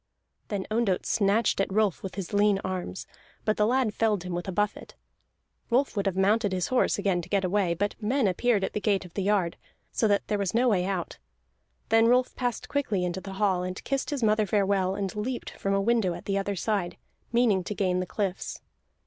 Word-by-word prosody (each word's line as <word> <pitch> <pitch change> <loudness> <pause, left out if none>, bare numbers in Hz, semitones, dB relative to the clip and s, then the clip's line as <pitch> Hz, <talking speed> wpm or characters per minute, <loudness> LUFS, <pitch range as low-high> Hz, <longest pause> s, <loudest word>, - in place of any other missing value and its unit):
Then 200 -3 -3
Ondott 215 -5 +1
snatched 210 0 +2
at 195 - -1
Rolf 210 -3 +1
with 190 - -6
his 195 0 -5
lean 205 -1 +3
arms, 185 0 -4 0.4
but 215 - +2
the 210 - +2
lad 250 -3 +1
felled 210 -5 +1
him 180 -1 -5
with 175 +1 -3
a - - -2
buffet. 205 +2 -2 0.7
Rolf 255 +3 +2
would 200 -1 0
have 190 - 0
mounted 205 +1 +2
his 180 -1 -1
horse 255 - +2
again 195 -3 +1
to 175 - -12
get 200 -1 +1
away, 185 -2 +1
but 205 +4 -1
men 240 +2 +2
appeared 205 +2 +1
at - - -2
the 210 - -2
gate 200 -3 +1
of 175 - -13
the 200 - -2
yard, 195 -3 +1 0.3
so 220 - +1
that 205 -1 +1
there 210 - 0
was 200 +1 -1
no 250 +2 +4
way 190 -6 +2
out. 190 -3 -3 0.7
Then 225 0 +5
Rolf 250 +1 +3
passed 245 -2 -2
quickly 215 -10 0
into 180 +1 -3
the 195 0 -7
hall, 190 -2 +1
and 185 +1 -5
kissed 275 0 -1
his 285 -5 -2
mother 215 -1 +3
farewell, 195 -2 +1
and 195 -1 -3
leaped 240 +4 -3
from 195 0 -1
a - - +2
window 210 -5 +2
at - - -10
the 195 - -1
other 200 0 -1
side, 195 -2 -1 0.3
meaning 230 -6 +3
to 210 - -4
gain 185 -2 +1
the 185 - -2
cliffs. 195 -2 -3
200 Hz, 215 wpm, -27 LUFS, 190-220 Hz, 0.7 s, Then